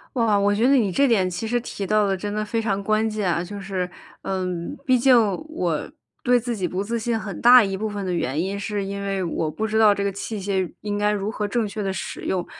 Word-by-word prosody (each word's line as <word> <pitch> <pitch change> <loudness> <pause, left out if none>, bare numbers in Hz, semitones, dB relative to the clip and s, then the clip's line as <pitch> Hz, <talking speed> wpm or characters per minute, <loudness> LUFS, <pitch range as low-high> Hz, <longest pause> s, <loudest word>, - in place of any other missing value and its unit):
哇， 225 -4 +3
我 205 0 +2
觉 225 +4 +2
得 275 - +5
你 220 -7 +3
这 280 +10 +3
点 200 -7 +3
其 180 +5 -4
实 240 +2 0
提 205 -4 -5
到 210 +1 +3
得 195 - 0
真 205 +2 -4
的 215 0 -1
非 225 +2 -1
常 200 -2 -1
关 215 +2 +1
键 210 -4 -1
啊。 170 0 0
就 200 +3 -7
是， 190 -2 -3 0.3
嗯， 185 +4 -3
毕 255 -1 +4
竟 255 +2 +5 0.3
我 175 - -2 0.3
对 245 -1 +3
自 235 -1 -3
己 185 - -1
不 180 +2 -2
自 230 +3 -2
信 230 0 -1
很 200 -2 -6
大 245 0 +8
一 195 -1 -1
部 215 +3 -2
分 205 -1 -4
的 185 - -2
原 150 -3 -1
因 195 +3 -2
是 200 0 -3
因 200 +1 -5
为 195 -1 -2
我 165 -2 -2
不 220 +8 -2
知 220 0 0
道 215 -2 +6
这 200 - -3
个 200 - 0
器 200 +2 -5
械 190 -2 -1
应 205 -1 -3
该 210 0 +2
如 205 0 -2
何 210 -1 -2
正 220 0 -1
确 210 +1 -5
地 195 -1 -1
使 - - -5
用。 180 -2 -1
205 Hz, 280 characters per minute, -23 LUFS, 190-220 Hz, 0.3 s, 大